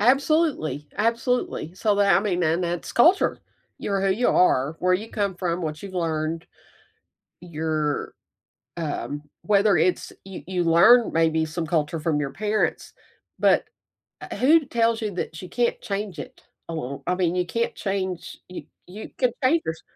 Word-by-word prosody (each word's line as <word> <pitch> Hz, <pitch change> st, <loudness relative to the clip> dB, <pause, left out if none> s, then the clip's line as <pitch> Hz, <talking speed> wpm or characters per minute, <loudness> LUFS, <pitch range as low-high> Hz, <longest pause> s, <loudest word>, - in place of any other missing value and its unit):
eAbsolutely, 270 Hz, -, +2 dB
absolutely. 230 Hz, -, -1 dB
So 210 Hz, +1 st, +1 dB
that 200 Hz, -1 st, +4 dB
I -, -, +3 dB
mean, 180 Hz, -4 st, -1 dB
and 165 Hz, +2 st, +1 dB
that's 175 Hz, 0 st, -4 dB
culture. 340 Hz, +10 st, +4 dB, 0.4 s
You 200 Hz, -, -4 dB
are 195 Hz, -, +1 dB
who 195 Hz, 0 st, +2 dB
you 240 Hz, +5 st, +1 dB
are, 150 Hz, -3 st, +3 dB
where 180 Hz, +1 st, +2 dB
you 215 Hz, +5 st, -4 dB
come 200 Hz, -3 st, -1 dB
from, 180 Hz, -1 st, -2 dB
what 155 Hz, +1 st, -4 dB
you've 195 Hz, -2 st, -8 dB
learned. 160 Hz, -1 st, -2 dB, 1.0 s
You're, 155 Hz, -3 st, -2 dB, 0.6 s
um 150 Hz, -2 st, -4 dB, 0.2 s
whether 205 Hz, -1 st, +3 dB
it's 180 Hz, +3 st, 0 dB
you 190 Hz, -1 st, -9 dB
you 180 Hz, -1 st, -1 dB
learn 195 Hz, +9 st, +6 dB
maybe 160 Hz, -1 st, +2 dB
some 160 Hz, +1 st, -4 dB
culture 155 Hz, 0 st, 0 dB
from 155 Hz, -1 st, 0 dB
your 140 Hz, -2 st, -2 dB
parents, 215 Hz, 0 st, -1 dB, 0.5 s
but -, -, +3 dB, 0.6 s
u -, -, -8 dB
uh, -, -, -3 dB
who 300 Hz, +3 st, +4 dB
tells 230 Hz, -2 st, +1 dB
you 210 Hz, -2 st, -2 dB
that 160 Hz, -3 st, -5 dB
you 180 Hz, -, -8 dB
can't 240 Hz, +2 st, 0 dB
change 200 Hz, -4 st, -4 dB
it -, -, -9 dB, 0.3 s
along 140 Hz, -4 st, -5 dB
I 180 Hz, -, +1 dB
mean, 180 Hz, -1 st, 0 dB
you 180 Hz, -1 st, 0 dB
can't 230 Hz, +5 st, -2 dB
change 190 Hz, -3 st, -3 dB
you 180 Hz, -, -7 dB, 0.2 s
you 205 Hz, +4 st, -9 dB
can 250 Hz, -2 st, +3 dB
change 315 Hz, +6 st, +4 dB
yours 160 Hz, 0 st, -4 dB
180 Hz, 170 wpm, -24 LUFS, 160-215 Hz, 1.0 s, learn